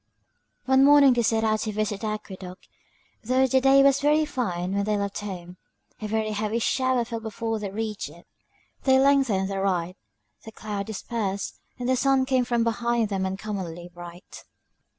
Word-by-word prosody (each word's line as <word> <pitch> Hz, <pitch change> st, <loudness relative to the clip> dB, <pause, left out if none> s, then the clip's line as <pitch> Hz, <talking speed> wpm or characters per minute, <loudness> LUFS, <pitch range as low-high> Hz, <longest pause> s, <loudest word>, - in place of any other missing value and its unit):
One 265 Hz, 0 st, +4 dB
morning 285 Hz, -2 st, +7 dB
they 240 Hz, -, +1 dB
set 225 Hz, -1 st, +1 dB
out 215 Hz, -1 st, +2 dB
to 215 Hz, -, -2 dB
visit 210 Hz, -1 st, -2 dB
the 220 Hz, -, -2 dB
aqueduct; 190 Hz, -3 st, -7 dB, 0.6 s
though 255 Hz, +3 st, +3 dB
the 260 Hz, 0 st, +2 dB
day 270 Hz, +1 st, +6 dB
was 275 Hz, 0 st, +4 dB
very 300 Hz, +2 st, +3 dB
fine 185 Hz, -10 st, -3 dB
when 200 Hz, 0 st, 0 dB
they 210 Hz, 0 st, 0 dB
left 200 Hz, -1 st, -3 dB
home, 180 Hz, -3 st, -7 dB, 0.4 s
a 215 Hz, -, -3 dB
very 215 Hz, 0 st, -1 dB
heavy 215 Hz, +1 st, -1 dB
shower 255 Hz, +1 st, +1 dB
fell 230 Hz, 0 st, -5 dB
before 225 Hz, 0 st, -3 dB
they 205 Hz, -1 st, -4 dB
reached 215 Hz, +1 st, -4 dB
it; -, -, -16 dB, 0.6 s
they 265 Hz, -1 st, +4 dB
lengthened 265 Hz, -8 st, +3 dB
their 195 Hz, 0 st, -3 dB
ride, 180 Hz, -2 st, -1 dB, 0.5 s
the 220 Hz, -, -10 dB
clouds 205 Hz, -2 st, -5 dB
dispersed, 205 Hz, -2 st, -4 dB, 0.2 s
and 245 Hz, -1 st, -4 dB
the 260 Hz, -, +3 dB
sun 270 Hz, 0 st, +2 dB
came 260 Hz, -2 st, +1 dB
from 235 Hz, -1 st, +1 dB
behind 235 Hz, -1 st, 0 dB
them 190 Hz, -2 st, -1 dB
uncommonly 190 Hz, -3 st, -5 dB
bright. 175 Hz, +1 st, -11 dB
220 Hz, 175 wpm, -25 LUFS, 195-255 Hz, 0.6 s, morning